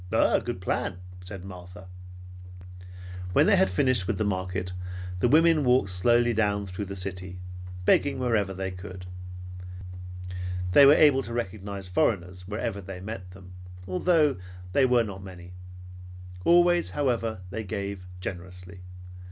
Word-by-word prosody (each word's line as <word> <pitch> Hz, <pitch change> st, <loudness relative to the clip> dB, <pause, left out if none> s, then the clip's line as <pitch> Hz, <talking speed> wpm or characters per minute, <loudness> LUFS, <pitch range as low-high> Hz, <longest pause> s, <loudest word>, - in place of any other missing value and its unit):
"A -, -, +3 dB
good 90 Hz, -, -5 dB
plan," 95 Hz, 0 st, -1 dB, 0.3 s
said 95 Hz, 0 st, -7 dB
Martha. 90 Hz, -1 st, -10 dB, 1.5 s
When -, -, +5 dB
they -, -, +5 dB
had 95 Hz, -, +4 dB
finished 115 Hz, -1 st, +2 dB
with 110 Hz, -3 st, 0 dB
the 110 Hz, -, 0 dB
market, 95 Hz, -2 st, -2 dB, 0.5 s
the 120 Hz, -, +3 dB
women 160 Hz, +3 st, +5 dB
walked 125 Hz, -6 st, +3 dB
slowly 120 Hz, +6 st, +3 dB
down 100 Hz, -2 st, +1 dB
through 95 Hz, +2 st, -5 dB
the 100 Hz, 0 st, -6 dB
city, 90 Hz, -1 st, -5 dB, 0.5 s
begging 140 Hz, -, +3 dB
wherever 115 Hz, -6 st, +1 dB
they 95 Hz, 0 st, -4 dB
could. 90 Hz, 0 st, -9 dB, 1.7 s
They 140 Hz, +7 st, +8 dB
were 145 Hz, -, +8 dB
able 145 Hz, -3 st, +6 dB
to 115 Hz, -, -7 dB
recognize 100 Hz, -3 st, -4 dB
foreigners 90 Hz, -1 st, 0 dB
wherever 105 Hz, 0 st, -3 dB
they 95 Hz, 0 st, -8 dB
met 95 Hz, -2 st, -7 dB
them, 90 Hz, 0 st, -13 dB, 0.3 s
although 150 Hz, -, +3 dB, 0.4 s
they 135 Hz, -2 st, +5 dB
were 125 Hz, -2 st, +4 dB
not 100 Hz, -3 st, -7 dB
many. 90 Hz, -1 st, -10 dB, 0.9 s
Always, 175 Hz, 0 st, +5 dB
however, 115 Hz, -7 st, 0 dB
they 110 Hz, +2 st, -3 dB
gave, 100 Hz, 0 st, -4 dB
and 90 Hz, -, -14 dB
gave 90 Hz, 0 st, -13 dB
generously. 90 Hz, 0 st, -7 dB
100 Hz, 145 wpm, -27 LUFS, 90-120 Hz, 1.7 s, They